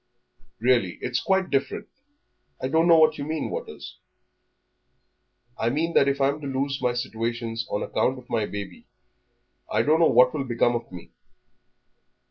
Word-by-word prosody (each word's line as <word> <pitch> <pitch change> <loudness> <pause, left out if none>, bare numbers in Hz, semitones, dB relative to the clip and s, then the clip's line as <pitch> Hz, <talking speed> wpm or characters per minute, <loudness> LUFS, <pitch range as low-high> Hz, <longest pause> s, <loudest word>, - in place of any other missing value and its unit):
"Really, 120 -6 +2
it's 125 - -2
quite 190 +4 0
different.... 135 -1 -1 0.7
I 130 - -3
don't 160 +3 +3
know 165 -1 +7
what 155 -2 +4
you - - -3
mean, 155 0 -3
Waters." - - -7 1.6
"I 115 - +1
mean 160 +6 -1
that 140 - +4
if 140 0 0
I 135 0 +3
am 145 +2 -4
to 140 - -5
lose 135 +1 -2
my 125 - +1
situations 115 -1 -3
on 105 - -2
account 130 - 0
of 125 -1 -13
my 110 -3 -1
baby, 100 -2 -8 0.8
I - - +2
don't 155 +2 +3
know 165 - +5
what 125 +1 +5
will 145 -3 -2
become 120 -1 +1
of 120 - -5
me. 90 -2 -11
130 Hz, 165 wpm, -25 LUFS, 115-145 Hz, 1.6 s, know